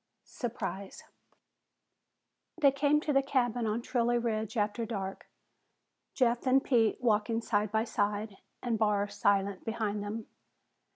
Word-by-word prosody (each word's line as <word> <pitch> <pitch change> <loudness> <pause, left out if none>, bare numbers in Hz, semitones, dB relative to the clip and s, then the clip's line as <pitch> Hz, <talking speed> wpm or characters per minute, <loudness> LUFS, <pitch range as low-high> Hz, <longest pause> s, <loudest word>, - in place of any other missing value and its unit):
SURPRISE 200 -5 -5 1.6
They 280 -4 +6
came 290 +2 +2
to 300 - -1
the 275 - +5
cabin 245 -4 0
on 220 +2 -1
Trilley 240 -1 +1
Ridge 220 -1 -2
after 210 +2 0
dark, 195 -4 -5 0.9
Jeff 245 -1 +1
and 265 +1 +4
Pete 230 -5 +3
walking 225 -1 +1
side 210 -3 0
by 220 0 +2
side 205 -2 -2 0.3
and 235 -3 0
Barr 205 -2 +2
silent 200 -1 +1
behind 215 -2 -2
them. 210 +2 -5
225 Hz, 125 wpm, -31 LUFS, 205-240 Hz, 1.6 s, They